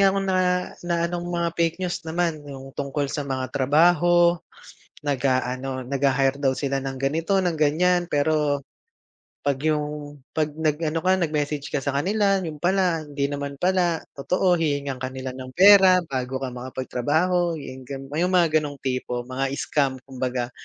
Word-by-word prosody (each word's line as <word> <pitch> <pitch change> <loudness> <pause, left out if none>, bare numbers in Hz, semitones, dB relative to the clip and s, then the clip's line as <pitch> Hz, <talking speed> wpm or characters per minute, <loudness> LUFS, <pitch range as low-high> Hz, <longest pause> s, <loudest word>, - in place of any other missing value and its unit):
nga 195 - +6
akong 195 0 0
na 190 -1 +1 0.5
na 175 - +1
anong 175 0 -3
mga 170 -1 0
fake 165 -1 +2
news 175 -1 -2
naman, 165 -1 -1
yung 135 -1 -9
tungkol 140 +1 -2
sa 150 - -2
mga 130 -1 -3
trabaho, 170 +5 +4 0.7
nag-aano 130 -1 -1
nagha-hire 135 +1 +1
daw 135 -2 +3
sila 135 -1 -1
ng 135 -1 -5
ganito 160 +8 0
ng 180 -3 +1
ganyan 175 +4 +2
pero, 145 -1 +1 0.7
'pag 140 -1 0
yung, 150 -1 -2 0.2
'pag 155 -1 0
nag 155 0 0
ano 160 +1 0
ka 185 +2 +3
nag-message 150 -4 -2
ka 145 - 0
sa 140 0 -3
kanila 195 +4 +2
yun 155 -3 -6
pala 175 -3 +1
hindi 140 -1 -2
naman 140 0 -4
pala 175 0 +1
totoo' 180 +5 +1
hihingan 140 -4 -1
ka 130 - -3
nila 130 0 -6
ng 130 0 -9
pera 190 -1 +7
bago 130 -3 -3
ka 130 - -3
makapagtrabaho 145 +8 -1
yung 130 -3 -9
gan 135 -1 -6
ah, 150 - -2
yung 180 +2 +2
mga 165 -3 +4
ganong 145 -2 -5
tipo 125 -2 -2
mga 130 +2 -2
scam 140 -3 0
kumbaga, 125 -2 -3
145 Hz, 165 wpm, -24 LUFS, 135-175 Hz, 0.7 s, pera